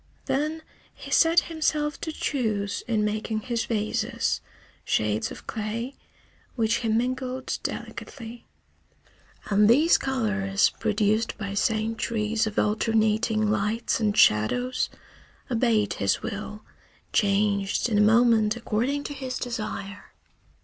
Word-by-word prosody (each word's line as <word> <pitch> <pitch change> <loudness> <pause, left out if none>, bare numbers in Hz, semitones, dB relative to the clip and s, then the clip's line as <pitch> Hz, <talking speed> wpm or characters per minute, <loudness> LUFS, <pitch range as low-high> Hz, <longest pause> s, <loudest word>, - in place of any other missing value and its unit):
Then 305 +4 -1 0.3
he - - -10
set 330 +1 +5
himself 305 -2 -1
to 320 - -3
choose, 215 -10 -2
in 215 -3 +1
making 215 +1 -2
his 235 0 -2
vases, 215 -2 -1 0.4
shades 105 +1 0
of - - -10
clay, 225 +4 -4 0.6
which 230 -1 +1
he 230 - -3
mingled 255 +3 -1
delicately. 235 -2 -7 1.0
And 205 +1 +5
these 300 +8 +5
colors, 205 -7 +1
produced 215 0 +1
by 200 -2 -4
centuries 220 +1 0
of 210 - -6
alternating 215 0 +2
lights 220 +3 0
and 210 -2 0
shadows, 245 - +3 0.6
obeyed 225 -3 +2
his 100 -1 0
will, 210 -1 -6 0.5
changed 200 0 +2
in 215 -3 +1
a - - +6
moment 225 0 +4
according 240 +5 -1
to 290 - -5
his 260 -2 -4
desire. 215 -4 -5
220 Hz, 115 wpm, -26 LUFS, 210-245 Hz, 1.0 s, a